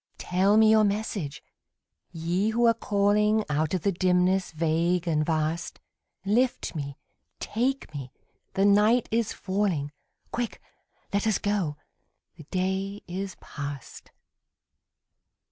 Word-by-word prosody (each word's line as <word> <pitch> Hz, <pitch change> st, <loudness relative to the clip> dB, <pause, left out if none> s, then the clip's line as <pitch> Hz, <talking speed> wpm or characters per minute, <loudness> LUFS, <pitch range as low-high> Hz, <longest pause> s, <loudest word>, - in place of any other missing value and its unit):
Tell 190 Hz, +4 st, +2 dB
me 220 Hz, 0 st, +6 dB
your 220 Hz, -1 st, +6 dB
message, 200 Hz, -7 st, -2 dB, 0.7 s
Ye 175 Hz, +5 st, 0 dB
who 235 Hz, +2 st, +2 dB
are 230 Hz, -, +6 dB
calling 210 Hz, 0 st, +2 dB
Out 155 Hz, +4 st, +1 dB
of 180 Hz, -, -3 dB
the 200 Hz, -, +2 dB
dimness 185 Hz, +1 st, +2 dB
vague 165 Hz, +2 st, +1 dB
and 155 Hz, -2 st, +2 dB
vast; 160 Hz, +1 st, -1 dB, 0.5 s
Lift 240 Hz, +5 st, +1 dB
me, 140 Hz, -4 st, -5 dB, 0.4 s
take 250 Hz, -, -2 dB
me, 135 Hz, -3 st, -6 dB, 0.4 s
the 195 Hz, -, +3 dB
night 210 Hz, +4 st, +4 dB
is 225 Hz, -1 st, +1 dB
falling; 185 Hz, -7 st, -1 dB, 0.4 s
Quick, 240 Hz, -2 st, -3 dB, 0.5 s
let 200 Hz, +2 st, +1 dB
us 215 Hz, -, +3 dB
go, 195 Hz, -8 st, -1 dB, 0.6 s
the 160 Hz, -3 st, -13 dB
day 190 Hz, +4 st, -2 dB
is 185 Hz, +1 st, -4 dB
past. 145 Hz, -2 st, -7 dB
190 Hz, 120 wpm, -27 LUFS, 165-210 Hz, 0.7 s, me